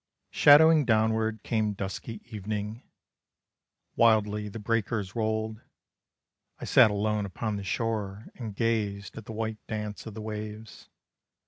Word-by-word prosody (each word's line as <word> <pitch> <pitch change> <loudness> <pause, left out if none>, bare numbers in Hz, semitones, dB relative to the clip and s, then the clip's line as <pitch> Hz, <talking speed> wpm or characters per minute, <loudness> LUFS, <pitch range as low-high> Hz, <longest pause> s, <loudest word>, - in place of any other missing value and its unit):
Shadowing 155 +1 +7
downward 110 -2 +1
came 110 -2 0
dusky 100 +3 -6
evening, 105 +2 -4 1.1
Wildly 105 -2 +3
the 105 - -8
breakers 110 -2 -1
rolled, 110 0 -2 1.0
I - - -6
sat - - +6
alone 105 0 -1
upon 105 +3 -3
the 100 - -5
shore 105 -1 -2
and 110 -5 -7
gazed 105 -4 -1
At 110 - -9
the - - -8
white 110 0 -3
dance 105 0 -5
of 110 - -8
the 110 - -6
waves. 110 0 -7
110 Hz, 125 wpm, -28 LUFS, 105-115 Hz, 1.1 s, Shadowing